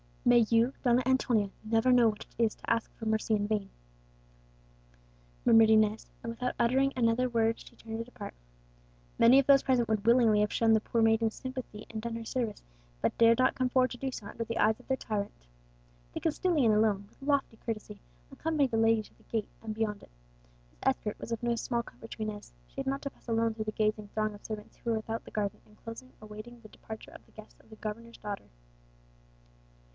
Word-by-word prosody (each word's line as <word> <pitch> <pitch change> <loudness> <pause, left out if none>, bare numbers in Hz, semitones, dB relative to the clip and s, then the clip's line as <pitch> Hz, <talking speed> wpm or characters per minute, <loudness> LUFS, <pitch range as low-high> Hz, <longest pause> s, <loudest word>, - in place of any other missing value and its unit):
"May 240 -2 +6
you, 235 +3 +3
Donna 245 0 +4
Antonia, 245 -5 +2
never 225 +3 +2
know 240 -2 +6
what 210 -1 -6
it 235 - -2
is 220 - +1
to - - -8
ask 230 -1 0
for 225 - -8
mercy 220 0 +1
in 205 -1 -1
vain!" 205 -2 -1 1.8
murmured 225 -1 +7
Inez; 215 0 +3 0.2
and 230 - -3
without 250 +2 -3
uttering 260 +3 +3
another 240 +1 +2
word 225 -1 +1
she - - -14
turned 225 0 -7
to - - -2
depart. 230 -4 -9 0.9
Many 235 +3 +7
of 275 - +2
those 275 -1 +7
present 250 -3 +2
would 215 -1 0
willingly 230 -3 +5
have 210 - 0
shown 225 -1 +4
the 220 - +5
poor 230 +1 -1
maiden 225 0 +4
sympathy 255 -3 -7
and 220 -1 -5
done 230 0 -4
her 230 0 -6
service, 230 -3 -3 0.4
but - - +1
dared 230 0 +6
not 255 - +4
come 255 -1 0
forward 255 0 +3
to 245 - -6
do 270 +2 -2
so 215 - -7
under 230 +2 -4
the 230 0 -4
eyes 220 +2 +3
of 250 - -18
their 265 - +1
tyrant. 205 -4 -3 0.8
The - - -3
Castilian 310 - +2
alone, 210 -2 +2
with - - -28
lofty 275 -5 0
courtesy, 220 -2 -6 0.3
accompanied 300 -5 0
the 225 - +1
young 225 - +4
lady 225 -1 +3
to - - -20
the - - -24
gate, 220 -3 -3
and 220 -1 -5
beyond 215 -2 -2
it. - - -17 0.6
His - - -29
escort - - 0
was 230 - -3
no 235 0 +1
small 235 +1 -1
comfort 225 -1 -13
to 220 - -4
Inez; 210 -1 -6
she - - -28
had 270 0 -3
not 275 +1 -1
to 280 - -3
pass - - -27
alone 230 -1 +1
through 215 -1 -4
the 215 - -2
gazing 215 0 0
throng 215 0 -1
of 205 - -14
servants 215 -1 -7
who 235 - -3
were 225 - +1
without 225 +1 -4
the - - -11
garden 205 -2 -2
enclosure 230 +4 -10
awaiting 215 +3 -10
the 215 - -13
departure 220 +1 -10
of - - -13
the - - -24
guests 215 -1 -14
of - - -23
the 220 - -11
governor's 230 +2 -7
daughter. 205 -1 -6
225 Hz, 215 wpm, -30 LUFS, 215-245 Hz, 1.8 s, murmured